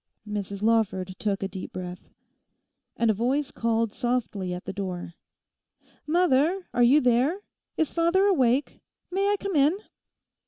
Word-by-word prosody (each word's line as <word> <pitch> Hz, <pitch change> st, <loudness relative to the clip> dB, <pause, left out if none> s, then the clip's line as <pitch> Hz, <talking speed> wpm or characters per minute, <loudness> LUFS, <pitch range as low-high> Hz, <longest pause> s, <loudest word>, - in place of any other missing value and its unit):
Mrs 200 Hz, -1 st, -4 dB
Lawford 200 Hz, -5 st, +1 dB
took 200 Hz, -2 st, -1 dB
a -, -, 0 dB
deep 190 Hz, -1 st, -7 dB
breath. 180 Hz, 0 st, -7 dB, 0.9 s
And 230 Hz, -1 st, +3 dB
a -, -, +1 dB
voice 260 Hz, +7 st, 0 dB
called 230 Hz, -1 st, 0 dB
softly 240 Hz, -7 st, -2 dB
at 180 Hz, 0 st, -6 dB
the -, -, -5 dB
door, 180 Hz, -4 st, -5 dB, 0.9 s
'Mother, 345 Hz, +2 st, +2 dB
are 245 Hz, -, +1 dB
you 250 Hz, +5 st, +6 dB
there? 250 Hz, +7 st, +2 dB, 0.4 s
Is 320 Hz, -, 0 dB
father 340 Hz, +4 st, +3 dB
awake? 270 Hz, -8 st, +2 dB, 0.3 s
May 390 Hz, +2 st, +1 dB
I -, -, +3 dB
come 395 Hz, -3 st, -3 dB
in? 295 Hz, +5 st, +4 dB
235 Hz, 145 wpm, -26 LUFS, 200-305 Hz, 0.9 s, you